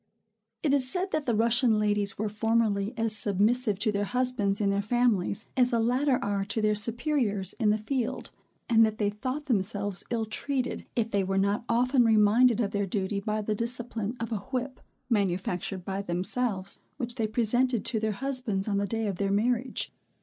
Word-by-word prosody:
It 290 -3 +2
is 260 -3 +4
said 375 +3 -1
that 310 -3 -2
the 235 - +2
Russian 230 +1 +3
ladies 205 -1 +1
were 215 - -1
formerly 215 -1 0
as 225 -1 0
submissive 210 +2 +2
to 215 +2 0
their 205 0 -1
husbands 245 -4 0
in 200 -2 +2
their 200 0 +1
families, 215 -3 +1
as 250 -1 +4
the 235 -2 +1
latter 250 +4 +2
are 200 -1 -1
to 205 +3 -1
their 215 -1 +2
superiors 220 - 0
in 220 -3 +3
the 210 - +3
field; 235 +2 -3 0.4
and 225 -2 +5
that 220 -1 +1
they 205 -2 0
thought 255 +7 -4
themselves 205 -5 0
ill 230 -2 -1
treated, 255 +4 -3
if 230 -1 0
they 200 -1 +1
were 195 +1 -1
not 200 +4 +1
often 250 +2 +3
reminded 225 +2 +4
of 200 -3 -1
their 200 -2 -1
duty 200 +1 -2
by 215 +1 -2
the 215 - -1
discipline 230 0 -3
of 230 +1 -4
a 220 - 0
whip, 260 +3 -4 0.3
manufactured 185 -3 -1
by 195 0 -3
themselves, 190 +2 -1 0.2
which 245 -3 -2
they 225 -2 -1
presented 240 +2 +1
to 225 - +1
their 215 0 -1
husbands 250 -5 -2
on 200 -1 0
the 200 - -1
day 225 +2 -2
of 200 -4 -2
their 195 0 0
marriage. 240 +5 0
220 Hz, 190 wpm, -28 LUFS, 200-245 Hz, 0.4 s, and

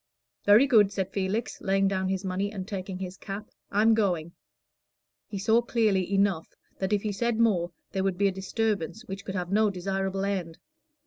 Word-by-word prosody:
"Very 210 +6 +7
good," 215 -7 +5
said 190 -1 -2
Felix, 200 +4 -2
laying 195 0 +2
down 190 -1 0
his 190 0 -2
money 190 +2 -1
and 190 -3 -6
taking 190 -3 -5
his 185 0 -6
cap. 200 +2 -7 0.2
"I'm 215 +3 +4
going." 180 -7 0 1.0
He 205 - -5
saw 220 +4 +3
clearly 215 -6 +1
enough 195 -4 +2 0.3
that 190 +1 -1
if 205 -1 +1
he 210 - -1
said 235 +3 -1
more, 185 -7 +2 0.2
there 190 - -1
would 190 -2 0
be 200 +1 +3
a - - +1
disturbance 205 +1 -2
which 195 -3 -6
could 190 - -5
have 180 0 -3
no 215 +1 +4
desirable 195 +1 -2
end. 180 -5 -3
195 Hz, 185 wpm, -27 LUFS, 190-210 Hz, 1.0 s, Very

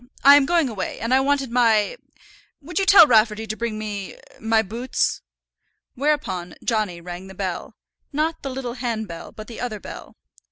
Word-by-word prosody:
I 280 +1 +9
am 285 -2 +4
going 335 -3 +3
away, 205 -6 -5
and 230 +3 -1
I 260 - +6
wanted 275 -2 0
my 230 - +3 0.6
would 315 +4 -4
you 390 - 0
tell 390 -4 +9
Rafferty 220 -3 +3
to 215 0 -4
bring 230 -1 -3
me 205 -3 -5 0.2
my 225 0 +2
boots?" 230 +5 -2 0.7
Whereupon 245 - -1
Johnny 215 -7 -1
rang 175 +2 -8
the 190 - -12
bell 185 -2 -4 0.4
not 310 +3 -1
the 275 - -4
little 255 -2 -4
handbell, 220 -8 -5
but 215 - -10
the 230 0 -10
other 230 -4 -4
bell. - - -10
230 Hz, 170 wpm, -22 LUFS, 210-270 Hz, 0.7 s, I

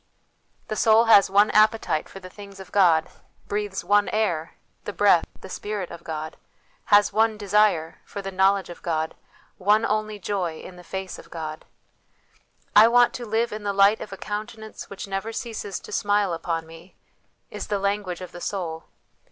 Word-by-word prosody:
The 215 - -3
soul 225 +1 +5
has 205 -4 +6
one 205 +2 +4
appetite, 215 -7 +2
for 195 - -10
the 185 - -10
things 200 +1 -12
of 190 -1 -11
God; 170 -5 +4 0.4
breathes 205 -1 -3
one 205 0 +3
air, 175 -7 -1 0.3
the 205 - -4
breath, 195 -5 +4 0.2
the - - -9
Spirit 205 -1 -5
of 170 - -10
God; 155 -1 -6 0.5
has 205 -1 +4
one 220 0 +2
desire, 200 -5 +1
for 205 - -8
the 195 -1 -5
knowledge 190 0 +2
of 175 - -11
God; 160 -2 -2 0.5
one 210 +4 +3
only 215 -1 -1
joy, 180 -4 -3
in 185 - -11
the 180 - -13
face 190 +1 -6
of - - -14
God. 155 -2 -7 0.6
" - - -36 0.3
I 215 +2 +9
want 245 +1 +4
to 240 -2 -6
live 225 +2 0
in 215 - -5
the 200 -1 -2
Light 200 +2 +4
of - - -7
a 195 - -7
Countenance 215 +2 -7
which 200 0 -7
never 195 +3 -3
ceases 220 -4 -5
to - - -12
smile 205 -3 +1
upon 165 0 -3
me," 165 +3 -15 0.5
1 - - -8
is - - -5
the 205 - 0
language 200 -2 -2
of 185 - -8
the 175 - -10
soul. 165 -5 -4
200 Hz, 185 wpm, -24 LUFS, 180-210 Hz, 0.6 s, I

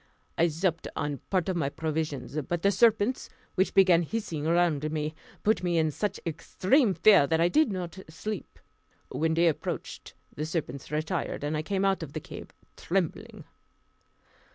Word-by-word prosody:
I 170 - +3
supped 165 +1 -1
on 145 -2 -2
part 185 -4 +1
of 190 - 0
my 150 -5 0
provisions, 150 -4 -3
but 175 -1 -2
the 200 - +5
serpents, 225 +3 +2 0.2
which 190 - 0
began 185 -3 +6
hissing 165 -4 -3
round 160 -3 +2
me, 155 0 -2 0.3
put 220 -1 +2
me 175 -2 0
into 155 -1 +2
such 205 +6 -2
extreme 190 - +1
fear 200 -10 +6
that 160 +2 +1
I 170 +1 +4
did 305 - +3
not 185 -1 -5
sleep. 205 +5 -6 0.5
When 160 +1 0
day 170 +1 +4
appeared 160 - -3 0.2
the 150 +1 -4
serpents 155 -4 -4
retired, 155 +1 -2
and 150 +1 -1
I 155 - 0
came 195 +4 -1
out 195 -2 +2
of 150 -3 -7
the 155 - -3
cave - - -10 0.3
trembling. 180 -2 -2
170 Hz, 165 wpm, -28 LUFS, 155-195 Hz, 0.5 s, began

